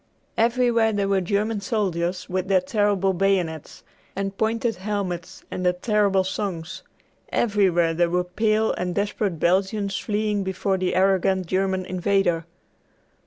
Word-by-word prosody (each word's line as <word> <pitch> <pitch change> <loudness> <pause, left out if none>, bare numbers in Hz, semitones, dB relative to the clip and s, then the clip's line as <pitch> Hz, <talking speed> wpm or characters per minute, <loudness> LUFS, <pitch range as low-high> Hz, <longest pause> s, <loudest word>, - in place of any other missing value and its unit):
Everywhere 235 -1 +2
there 200 -2 0
were 195 -1 +2
German 205 +3 -1
soldiers 185 -6 -1
with 185 +1 -2
their 190 -1 +4
terrible 195 0 +1
bayonets 175 -4 -1 0.3
and 195 0 -3
pointed 225 +1 0
helmets 185 -2 -4
and 185 - -4
their 180 0 +3
terrible 200 0 +2
songs. 185 -3 -4 0.5
Everywhere 185 -7 +2
there 170 +1 +2
were 180 +1 +1
pale 215 +4 +1
and 180 -1 -3
desperate 200 -3 -1
Belgians 195 +3 +1
fleeing 210 -1 -1
before 190 0 -1
the 185 -1 0
arrogant 190 0 +2
German 190 +1 0
invader. 180 -2 0
195 Hz, 130 wpm, -24 LUFS, 180-210 Hz, 0.5 s, their